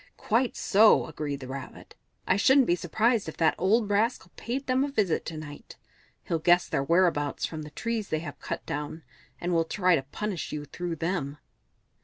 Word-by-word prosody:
"Quite 235 +3 0
so!" 215 +2 +5
agreed 145 -3 -5
the 130 - -7
Rabbit. 130 0 -8 0.3
"I 185 - +3
shouldn't 265 +6 +5
be 175 - +2
surprised 215 +4 +1
if - - -10
that 160 -1 +3
old 210 +4 +3
rascal 225 +5 0
paid 265 +4 -4
them 255 +1 +2
a 285 - -1
visit 210 - 0
to 160 - -5
night. 145 -2 -10 0.5
He'll 165 - -1
guess 175 +2 +4
their 135 - 0
whereabouts 165 -2 +2
from 160 -1 -6
the 150 - -8
trees 225 +5 -3
they 155 - 0
have 145 -3 -8
cut - - -5
down, 150 +2 -5 0.4
and 175 0 -2
will 165 -1 +3
try 180 +2 +2
to 140 - 0
punish 180 +7 -5
you 150 -1 -5
through 170 +4 -5
them." 160 -4 -2
175 Hz, 190 wpm, -27 LUFS, 150-215 Hz, 0.5 s, so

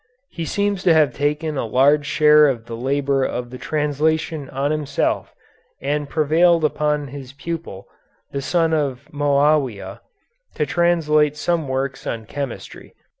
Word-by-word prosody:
He 165 - -5
seems 200 +1 -1
to 170 -3 +5
have 150 -5 +3
taken 150 +2 -1
a - - -1
large 145 +6 +3
share 150 0 +5
of 120 -5 -2
the 115 -1 -7
labor 135 +2 0
of 125 -1 -3
the 125 - -8
translation 155 0 -1
on 140 +2 -1
himself 150 -2 -1 0.4
and 145 +1 -2
prevailed 160 +2 +3
upon 150 -1 -1
his 135 -1 -9
pupil, 140 - -6 0.5
the 140 - -3
son 165 +2 +1
of 140 -3 -1
Moawia, 145 -5 +1 0.5
to 150 - 0
translate 155 -2 +2
some 165 -2 -1
works 135 0 -3
on 115 -1 -4
chemistry. 140 -1 -7
145 Hz, 140 wpm, -21 LUFS, 135-155 Hz, 0.5 s, to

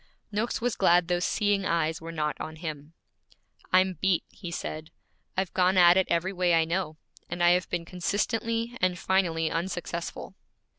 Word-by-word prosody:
Noakes 215 +3 -1
was 245 0 -1
glad 175 -2 +3
those 175 0 +1
seeing 205 -2 +1
eyes 165 -2 0
were 165 +1 -7
not 150 -2 -1
on 160 0 -6
him. 155 -2 -7 0.8
'I'm 185 -2 +3
beat,' 190 -3 +2
he 180 - -8
said. 155 -1 -5 0.5
'I've 190 -1 -1
gone 185 0 +3
at 175 -1 +7
it 190 0 +3
every 175 +3 0
way 180 -2 +2
I 165 -1 +3
know, 165 -2 -2 0.3
and 175 0 -2
I 175 - +6
have 180 0 +1
been 175 -1 -2
consistently 225 +6 -1
and 180 -1 +2
finally 170 -4 +1
unsuccessful.' 170 0 -4
175 Hz, 165 wpm, -27 LUFS, 165-190 Hz, 0.8 s, at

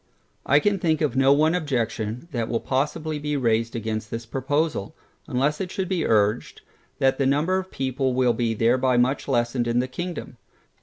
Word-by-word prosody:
I 140 - +5
can 200 +4 +1
think 160 -3 +1
of 150 -6 0
no 135 +1 +4
one 155 +3 +4
objection, 125 -5 -2
that 115 -3 -2
will 115 - 0
possibly 150 +3 -2
be 150 0 -2
raised 115 -2 0
against 110 -1 -3
this 115 0 -5
proposal, 135 -1 -1 0.3
unless 140 +6 0
it 185 - -3
should 190 0 -3
be 180 -3 -1
urged, 105 +1 +1 0.4
that 135 0 +2
the 135 - +2
number 155 +7 +2
of 190 0 -7
people 130 -2 -1
will 125 -2 +3
be 115 -1 -1
thereby 125 +3 +2
much 125 +3 +1
lessened 120 -2 0
in 120 0 0
the 125 +1 +1
kingdom. 175 +5 -6
130 Hz, 185 wpm, -24 LUFS, 120-150 Hz, 0.4 s, I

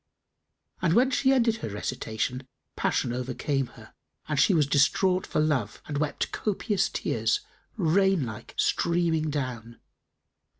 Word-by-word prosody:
And 170 -3 +2
when 255 +3 +4
she 265 +1 +3
ended 235 -4 +3
her 220 - -5
recitation, 110 +5 -3 0.3
passion 120 - 0
overcame 130 +2 -2
her - - -14 0.3
and 150 -3 0
she 190 - +5
was 155 -3 +4
distraught 180 +7 +2
for - - -1
love 140 -9 0
and 145 -2 -3
wept 150 -1 -2
copious 205 -1 0
tears, 415 - 0 0.4
rain 190 - +3
like 110 -2 -9
streaming 165 -2 +1
down. 125 -5 -4
155 Hz, 130 wpm, -27 LUFS, 130-190 Hz, 0.4 s, she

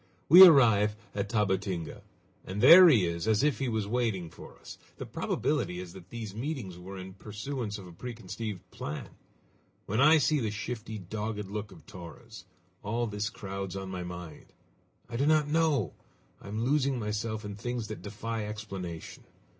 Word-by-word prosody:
We 180 +5 +12
arrive 110 - +6 0.2
at 100 0 -3
Tabatinga, 95 -5 -1 0.4
and 95 +2 -6
there 170 - +10
he 115 - +4
is 85 +3 -3
as 110 +2 +3
if 150 -2 +1
he 135 -2 -1
was 110 -3 -1
waiting 105 -7 -1
for - - -13
us! - - -12 0.2
The - - -6
probability 90 - -2
is 90 -1 -8
that 95 -1 -13
these 110 -4 -6
meetings 120 - -4
were 95 +2 -9
in 95 0 -8
pursuance 105 +2 -5
of 100 - -10
a 90 - -11
preconceived 110 -2 -7
plan. 75 - -6 0.8
When 110 +6 0
I 155 +3 +7
see 150 0 +2
the 110 -4 -1
shifty, 110 +1 -5
dogged 105 +2 -4
look 105 +1 -5
of 80 -2 -15
Torres, 90 -4 -11 0.4
all 115 +4 -1
this 105 -1 -3
crowds 95 -3 -6
on 95 -1 -5
my 90 -1 -4
mind. 90 -2 -8 0.6
I 115 - -5
do 140 +4 +1
not 155 -1 +4
know! 150 - +1 0.5
I - - -12
am 110 +3 -3
losing 140 -1 +1
myself 110 0 -3
in 100 -1 -6
things 120 +1 -4
that 110 - -6
defy 105 +1 -4
explanation! 95 -6 -7
105 Hz, 170 wpm, -29 LUFS, 95-120 Hz, 0.8 s, We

